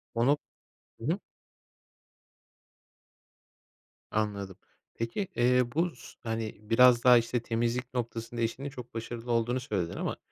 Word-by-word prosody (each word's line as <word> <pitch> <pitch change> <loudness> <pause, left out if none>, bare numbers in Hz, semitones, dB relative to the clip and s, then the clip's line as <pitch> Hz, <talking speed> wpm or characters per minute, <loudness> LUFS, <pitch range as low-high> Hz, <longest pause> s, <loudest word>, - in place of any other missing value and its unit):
Onu 125 +6 +4 0.6
Hı - - -8
hı. 170 +6 +1 2.9
Anladım. 100 -3 -2 0.4
Peki, 115 - -2
eee, 125 +1 +4
bu 170 -1 +1
s - - -13
hani, 110 -1 -3
biraz 120 +3 +6
daha 125 -1 +9
işte 120 +1 +1
temizlik 120 +2 -1
noktasında 115 -1 -3
eşinin 120 +5 -1
çok 125 -3 -10
başarılı 115 +1 -5
olduğunu 120 +2 +2
söyledin 100 -9 -2
ama - - -2
120 Hz, 115 wpm, -30 LUFS, 115-125 Hz, 2.9 s, daha